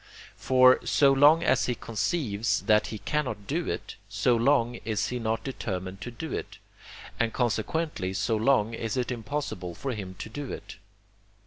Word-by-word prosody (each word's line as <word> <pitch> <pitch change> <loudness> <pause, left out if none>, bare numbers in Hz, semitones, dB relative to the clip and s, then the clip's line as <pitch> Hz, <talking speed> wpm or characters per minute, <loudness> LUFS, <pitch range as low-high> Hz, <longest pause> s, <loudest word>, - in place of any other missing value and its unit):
For, 130 0 +5
so 140 -2 +4
long 150 +4 +6
as 130 -5 +2
he 125 - 0
conceives 115 - -1
that 105 +1 +3
he 110 - -5
cannot 130 -5 -2
do 165 - -2
it, - - -5
so 125 - +2
long 120 -1 +2
is 110 -1 -1
he 125 - -3
not 115 -1 -1
determined 95 -7 -5
to - - -5
do 140 +7 -6
it, - - -5 0.6
and 115 -1 +1
consequently 120 - -1
so 110 +3 0
long 115 -1 +2
is 115 +1 -3
it 125 0 -1
impossible 115 - -4
for 135 - -4
him 95 -4 -6
to 95 - -7
do 135 +4 -6
it. - - -8
120 Hz, 170 wpm, -27 LUFS, 105-135 Hz, 0.6 s, long